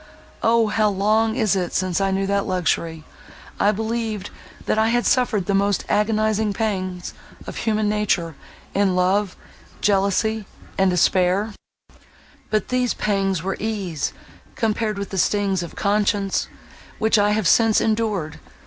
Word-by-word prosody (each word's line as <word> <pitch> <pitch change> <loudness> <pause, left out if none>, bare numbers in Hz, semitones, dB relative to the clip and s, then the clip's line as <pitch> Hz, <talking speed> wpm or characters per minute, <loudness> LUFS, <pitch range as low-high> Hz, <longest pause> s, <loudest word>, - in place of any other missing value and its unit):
O! 230 0 +3
how 215 0 +2
long 215 +3 +1
is 220 -6 +2
it 180 -2 -2
since 185 0 0
I 195 - +2
knew 195 0 0
that 200 0 0
luxury! 165 -3 -1 0.6
I 205 - +4
believed, 220 -1 -3 0.3
that 215 - +1
I 220 - +3
had 240 +1 +1
suffered 245 -7 +2
the 200 - 0
most 200 0 +1
agonizing 215 0 +1
pangs 185 -4 -3 0.3
of - - -7
human 215 -1 0
nature, 195 -6 0 0.4
in 195 -2 +2
love, 185 +2 +1 0.4
jealousy, 205 +1 +1 0.3
and 190 0 +3
despair—but 185 +3 +2 1.2
these 250 -1 0
pangs 195 -4 0
were 195 +1 -2
ease, 200 -8 -2 0.4
compared 215 -2 -1
with 200 -1 -5
the 190 - -2
stings 195 -1 +1
of 170 - -7
conscience, 200 -1 0 0.5
which 220 0 +3
I 205 0 +3
have 210 -4 +1
since 225 +2 +4
endured. 215 -8 -1
205 Hz, 140 wpm, -22 LUFS, 190-220 Hz, 1.2 s, I